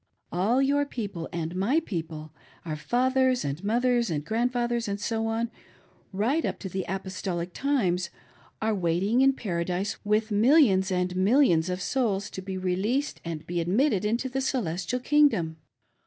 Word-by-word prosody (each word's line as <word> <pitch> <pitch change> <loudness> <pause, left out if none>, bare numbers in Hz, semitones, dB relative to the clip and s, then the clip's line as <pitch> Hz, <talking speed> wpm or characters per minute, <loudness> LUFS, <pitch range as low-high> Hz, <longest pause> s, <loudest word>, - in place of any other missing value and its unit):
All 220 +10 +2
your 285 +1 +2
people 205 -11 -5
and 170 0 -4
my 220 - +2
people, 160 - -6 0.3
our 155 -2 -3
fathers, 255 - +1
and 145 +6 -4
moth 235 +5 +1
ers, 240 -2 +2
and 150 -3 -2
grandfathers, 240 +2 0
and 200 0 -2
so 225 +1 -1
on, 225 +1 -1 0.6
right 235 +12 +1
up - - -2
to 190 - -6
the 190 +1 -3
apostolic, 185 -2 -4
times, 190 -11 0 0.5
are 220 0 +2
waiting 190 +6 +1
in 270 0 +5
Paradise 180 -3 -2
with 215 +1 +1
millions 210 -4 +4
and 180 0 0
.mil 205 +10 +4
lions 170 - +3
of 180 0 -3
souls 215 -7 0
to 190 - -6
be 190 0 -5
released 195 +10 -1
and 165 -2 -5
be 175 0 -2
admitted 205 - +2
into 230 +5 0
the 265 +1 -2
Celestial 225 - -1
King 295 +3 +5
dom. 160 - -3
205 Hz, 165 wpm, -27 LUFS, 180-245 Hz, 0.6 s, in